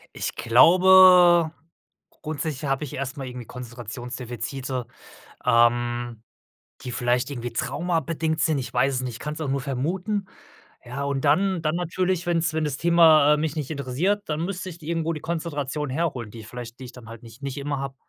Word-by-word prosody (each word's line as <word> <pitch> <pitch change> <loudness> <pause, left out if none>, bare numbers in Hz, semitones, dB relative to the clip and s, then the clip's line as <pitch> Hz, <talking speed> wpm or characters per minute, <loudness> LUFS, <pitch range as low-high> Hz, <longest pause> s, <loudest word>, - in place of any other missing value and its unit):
Ich - - -3
glaube, 175 +5 +6 0.7
grundsätzlich 155 -1 -4
habe 135 +2 0
ich 145 - -7
erst 135 0 -4
mal 135 - -5
irgendwie 125 -1 -8
Konzentrationsdefizite, 125 +2 -6 0.6
ähm, 120 0 +2 0.6
die 125 - -5
vielleicht 120 +3 0
irgendwie 120 -3 -5
Trauma-bedingt 160 +3 -1
sind, 160 -2 +2
ich 130 - -5
weiß 135 +1 +2
es - - 0
nicht, 125 -2 -4
ich - - -8
kann 150 +1 -5
s 155 - -9
auch 150 - -3
nur 140 0 0
vermuten. 180 - -2 0.6
Ja 125 +3 -5
und 140 0 -2
dann 185 +4 +2
dann 155 +1 0
natürlich, 180 +1 -1
wenn's 165 -2 +1
wenn 160 0 0
das 145 -3 -2
Thema, 160 -3 +6
äh, - - +1
mich 155 -1 -1
nicht 150 -3 -4
interessiert, 155 +9 -1
dann 155 +1 -2
müsste 185 0 -4
ich 170 0 -12
irgendwo 165 +1 -1
die 155 - -6
Konzentration 150 -4 -3
herholen, 130 -6 -2
die 115 +1 -10
vielleicht 120 +1 -9
die - - -7
ich 125 - -10
dann 120 -3 -13
halt 115 +1 -10
nicht 115 +3 -14
nicht 140 0 -4
immer 140 0 -3
habe. 135 -1 -5
145 Hz, 180 wpm, -24 LUFS, 125-165 Hz, 0.7 s, glaube